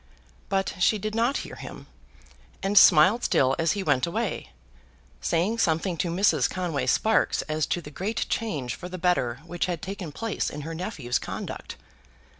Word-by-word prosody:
But 195 0 0
she 215 +4 +4
did 215 +1 -4
not 235 +5 +1
hear - - -10
him, - - -9 0.8
and 195 +1 0
smiled 185 +5 +7
still 135 0 +3
as 165 0 +2
he 200 - -3
went 145 -5 +2
away, 170 - -3 0.7
saying 190 - 0
something 170 0 +1
to 170 - -1
Mrs. 165 -6 +2
Conway 175 -6 -2
Sparkes 220 0 +2
as 155 -1 -1
to 175 - -1
the 150 - -10
great 200 +8 -2
change 145 - -2
for 180 - -8
the 185 - -6
better 170 -10 0
which 175 +1 -2
had 175 -3 -2
taken 190 -5 -5
place 225 +7 -2
in 150 - -7
her 160 +3 -6
nephew's 160 - -2
conduct. - - -6
175 Hz, 170 wpm, -26 LUFS, 155-200 Hz, 0.8 s, smiled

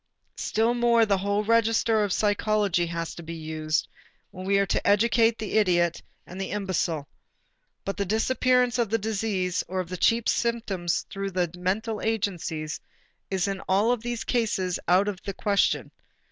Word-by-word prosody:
Still 225 +2 +1
more 235 -1 +4
the 200 -2 +1
whole 200 +2 0
register 225 0 +3
of 205 - -1
psychology 205 -3 +1
has 165 0 -4
to - - -9
be 165 0 -7
used, 155 -1 -2 0.4
when 185 +1 -8
we 200 0 +3
are 200 - +3
to - - -1
educate 225 +2 +4
the 220 0 0
idiot 175 -4 +2 0.2
and 185 +2 -8
the 190 - -3
imbecile. 185 -7 -2 0.8
But 195 - -3
the 200 - 0
disappearance 250 +4 +2
of 235 -3 +1
the 225 - +2
disease 200 -4 -1
or 185 +1 -3
of 180 -2 -3
the 185 - -4
chief 230 +5 +2
symptoms 215 -7 0
through 195 0 -3
the 180 -3 -1
mental 205 +5 -2
agencies 180 -8 -2 0.5
is 190 -1 0
in 195 -1 -2
all 210 +6 +3
these 240 0 -4
cases 205 -7 0
out 185 +3 +4
of 195 -2 -3
the 200 - -5
question. 200 -2 +1
200 Hz, 165 wpm, -26 LUFS, 180-225 Hz, 0.8 s, more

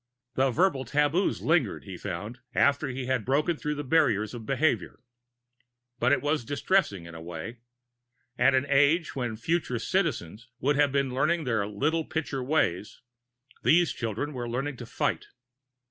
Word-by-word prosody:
The 135 +2 +2
verbal 145 -1 +2
taboos 150 - +1
lingered, 155 - +1
he 95 -2 -8
found, 105 +8 -6 0.2
after 140 +1 +3
he 130 0 -4
had 130 -3 0
broken 150 +7 +1
through 150 0 -3
the 145 - -4
barriers 125 -8 +2
of 115 -3 -8
behavior. 145 +3 0 1.0
But 120 +3 +3
it 145 - +2
was 150 -2 0
distressing, 145 - 0
in 85 - -10
a 80 - -9
way. 85 +8 -7 0.8
At 130 +2 +4
an 130 +1 +2
age 145 +4 +3
when 120 -4 -2
future 155 0 -1
Citizens 120 - -2
would 145 +2 +2
have 145 -1 +3
been 140 -2 0
learning 155 +5 +1
their 110 -6 0
Little 150 +11 0
Pitcher 155 -4 -3
Ways, 115 - 0 0.6
these 175 +1 +4
children 120 +6 -3
were 120 -2 -4
learning 135 +3 -3
to 120 - -8
fight. - - -1
135 Hz, 160 wpm, -28 LUFS, 115-150 Hz, 1.0 s, At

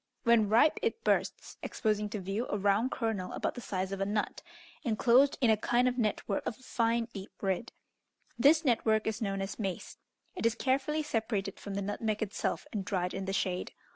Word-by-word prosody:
When 235 -3 +4
ripe 235 +8 +5
it 455 0 -1
bursts, - - 0
exposing 210 -1 -1
to 210 - -4
view 195 +6 -2
a - - 0
round 205 +5 +2
kernel 225 -8 -2
about - - -1
the 245 - -7
size 190 -3 -3
of 195 0 -3
a - - +2
nut, 210 0 -1 0.4
enclosed 245 +3 +4
in 235 -3 +5
a - - +5
kind 240 +3 +2
of 250 0 0
net 215 -3 0
work 195 - -1
of 225 - -3
a 260 - -20
fine 230 -1 +1
deep 195 -1 -7
red: 195 +4 -1 0.6
this 305 +7 +5
network 220 -3 +2
is 220 0 -2
known 195 -2 -1
as 195 - -6
mace. 195 -4 -4 0.4
It 295 - +1
is 230 - 0
carefully 275 +5 0
separated 220 -7 -2
from 200 -1 -6
the 200 - -1
nutmeg 215 +2 -1
itself, 205 0 -2
and 205 -3 -2
dried 180 -2 -1
in 195 0 -3
the 195 - -2
shade. 185 -2 -1
220 Hz, 200 wpm, -31 LUFS, 195-240 Hz, 0.6 s, ripe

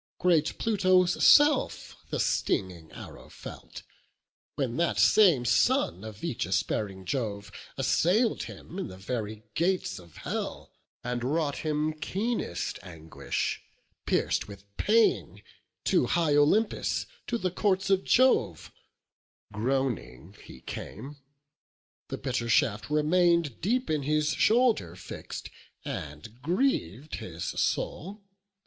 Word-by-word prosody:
Great 170 -4 +2
Pluto's 185 -5 +2
self 290 -1 +5
the - - -2
stinging 85 -4 -1
arrow - - -11
felt, - - -10 0.7
When 130 -4 -2
that 170 +1 +1
same 175 - +5
son 95 -4 +2
of 110 -2 -9
aegis 95 - 0
bearing 95 -3 -4
Jove 105 -2 -3 0.3
Assail'd 215 +8 +2
him 180 - -9
in 190 - -3
the 95 - -10
very 110 +1 -5
gates 180 - 0
of 85 -3 -16
hell, - - -5 0.3
And 120 0 -3
wrought 145 +2 0
him 155 0 -1
keenest 195 - -3
anguish; 80 -2 -4 0.5
pierc'd - - +1
with 100 -1 -12
pain 225 +2 +2 0.4
To - - +2
high 165 -4 +2
Olympus, 160 +10 +2 0.2
to 240 - -1
the 185 -5 -2
courts 195 0 0
of 190 -1 +3
Jove, 250 - +2 0.8
Groaning, 105 - -2
he 65 - -13
came; 135 +7 -8 0.9
the - - -5
bitter 125 -3 -2
shaft 105 0 +2
remain'd 165 -1 +2
Deep 250 +8 0
in 155 -2 0
his 150 +2 +1
shoulder 220 - +2
fix'd, 90 - -8 0.3
and 75 - -7
griev'd 155 - -1
his 85 -6 -7
soul. 200 - -2
145 Hz, 115 wpm, -28 LUFS, -, 0.9 s, self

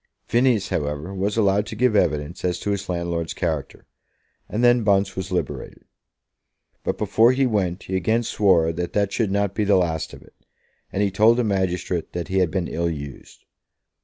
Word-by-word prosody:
Phineas, 120 -4 +2
however, 75 +4 -3
was 100 +3 -2
allowed 100 -1 +2
to 110 - -6
give 125 0 +2
evidence 75 -3 0
as 90 -1 0
to 105 - -1
his 100 -1 -3
landlord's 85 -2 -2
character, 80 -6 -3 0.6
and 110 +3 -1
then 120 -1 +5
Bunce 100 -2 +2
was 95 0 -5
liberated. 90 -5 -4 1.0
But - - -2
before 115 +3 +4
he 135 +1 +2
went 100 -6 -1
he 95 - -4
again 110 +6 +1
swore 90 -7 +2
that 85 +1 -4
that 100 -1 0
should 115 -4 0
not 100 0 0
be 105 - 0
the 100 -1 +3
last 85 -3 0
of - - -12
it, - - -21 0.6
and 100 - 0
he 100 - +1
told 110 +4 +4
the 125 - +2
magistrate 95 -4 -1
that 85 +1 -4
he 95 +1 +1
had 90 -3 +2
been 90 0 -2
ill 85 0 -1
used. 70 -4 -8
95 Hz, 190 wpm, -23 LUFS, 85-105 Hz, 1.0 s, then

